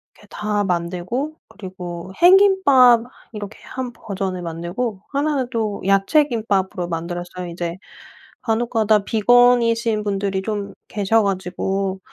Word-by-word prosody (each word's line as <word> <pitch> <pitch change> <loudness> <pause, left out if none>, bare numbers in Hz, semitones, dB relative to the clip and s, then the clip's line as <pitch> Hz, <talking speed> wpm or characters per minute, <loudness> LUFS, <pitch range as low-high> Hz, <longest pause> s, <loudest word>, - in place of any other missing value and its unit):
이렇게 - - -20
다 210 -1 -1
만들고 180 - -2
그리고 185 -2 -8
햄김밥 350 - +6 0.3
이렇게 205 -1 -8
1 255 -2 -5
버전을 190 -5 -5
만들고 175 +6 -4
1 290 +1 0
는 255 -2 -1
또 215 -4 -2
야채 195 +10 +4
김밥으로 195 -6 -1
만들었어요. 175 +2 -5
이제 170 0 -4 0.7
간혹가다 225 -2 +1
비건이신 230 -1 +3
분들이 195 -1 -1
좀 205 -1 -4
계셔 215 +2 +1
가지고 190 0 -2
205 Hz, 265 characters per minute, -21 LUFS, 185-235 Hz, 0.7 s, 햄김밥